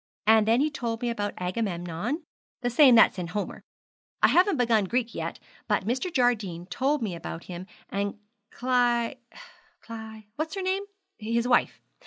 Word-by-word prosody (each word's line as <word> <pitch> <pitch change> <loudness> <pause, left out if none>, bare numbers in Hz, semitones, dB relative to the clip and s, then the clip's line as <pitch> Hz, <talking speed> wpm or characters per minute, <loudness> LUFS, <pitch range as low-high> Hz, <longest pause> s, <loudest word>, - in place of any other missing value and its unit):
And 220 0 +5
then 230 +4 +4
he 305 +1 +1
told 235 -5 -3
me 240 - +1
about 205 -3 -3
Agamemnon, 180 - -3 0.4
the 245 -1 -1
same 255 0 +7
that's 220 -3 +6
in 175 - -3
Homer. 200 +5 -4 0.6
I - - +7
haven't 370 -1 +4
begun 230 -4 +3
Greek 235 +3 -1
yet, - - -4 0.3
but - - +1
Mr. 255 - -1
Jardine 215 - 0
told 275 +6 0
me 200 -5 -2
about 165 0 -7
him 180 +1 -8 0.2
and 200 +1 -2 0.3
Cly 245 0 +1 0.6
Cly 220 -1 -9
what's 315 +3 -3
her 385 - -3
name? 380 +2 0 0.3
his 230 +2 0
wife. 245 - +2
230 Hz, 160 wpm, -27 LUFS, 205-255 Hz, 0.6 s, same